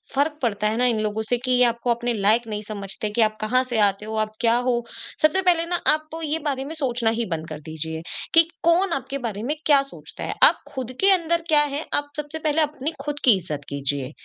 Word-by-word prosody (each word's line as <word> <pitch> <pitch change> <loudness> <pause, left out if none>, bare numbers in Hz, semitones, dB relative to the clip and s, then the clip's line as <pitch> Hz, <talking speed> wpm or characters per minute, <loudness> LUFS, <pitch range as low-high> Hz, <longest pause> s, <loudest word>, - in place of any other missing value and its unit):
फ़र्क 295 +2 +1
पड़ता 210 -4 0
है 215 +1 -1
ना 250 - +2
इन 235 -3 +2
लोगों 215 0 -2
से 245 - +2
कि 255 - 0
ये 250 0 +5
आपको 235 +1 -1
अपने 240 +1 -1
लायक 220 +3 +2
नहीं 210 -1 -4
समझते, 200 0 -4
कि 210 +3 0
आप 215 0 +2
कहाँ 250 +4 +2
से 245 -3 -2
आते 205 0 +2
हो, 220 0 -5
आप 215 0 -1
क्या 230 -1 +3
हो? 245 -1 0 0.4
सबसे 310 +5 +4
पहले 350 -3 +3
ना 350 +1 -1 0.2
आप 310 0 -3 0.2
ये 310 +1 -1
बारे 270 -2 -1
में 305 - -6
सोचना 250 -6 0
ही 230 +1 -1
बंद 160 -1 -3
कर 155 -1 -6
दीजिए, 160 +1 -5 0.3
कि 330 - +8 0.2
कौन 345 +3 +3
आपके 275 -1 -3
बारे 220 -5 -4
में 290 +6 -1
क्या 285 -2 +6
सोचता 275 - -11
है? - - -2
आप - - +7
खुद 260 -3 -5
के 390 - +4
अंदर 340 -2 +2
क्या 300 -2 +5
है, 295 +1 -2
आप 290 0 0
सबसे 300 +1 -4
पहले 310 0 +1
अपनी 300 0 -2
खुद 290 +1 -3
की 240 -5 +6
इज़्ज़त 155 -5 -5
कीजिए। 140 -1 -2
245 Hz, 240 wpm, -23 LUFS, 215-295 Hz, 0.4 s, कि